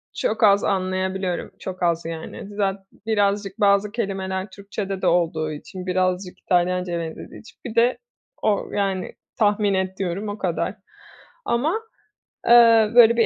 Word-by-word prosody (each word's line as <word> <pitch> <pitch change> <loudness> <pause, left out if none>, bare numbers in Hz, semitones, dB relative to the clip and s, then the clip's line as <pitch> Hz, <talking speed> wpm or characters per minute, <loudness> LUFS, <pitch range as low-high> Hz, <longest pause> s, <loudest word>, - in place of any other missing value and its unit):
çok - - -1
az 200 -1 +6
anlayabiliyorum, 185 -1 -1
çok 185 -1 -6
az 170 -1 +1
yani. 165 +5 -7
Zat 195 -1 -1 0.2
birazcık 205 -1 0
bazı 200 0 +3
kelimeler 195 -3 -3
Türkçede 200 -1 -5
de - - +1
olduğu 165 -2 +1
için, 180 +5 -8
birazcık 185 0 -1
İtalyancaya 180 -1 0
benzediği 165 -1 -7
için, 225 - -17
bir 230 -2 -6
de 235 +1 +3 0.4
o 210 -2 0
yani, 195 -2 -1 0.2
tahmin 205 -2 +2
ediyorum 190 +1 -2
o 205 - -5
kadar. 185 0 -2 0.7
Ama, 310 - 0 0.7
eee, 230 -2 +7
böyle 235 -1 +8
bir 230 - +5
195 Hz, 135 wpm, -23 LUFS, 185-210 Hz, 0.7 s, böyle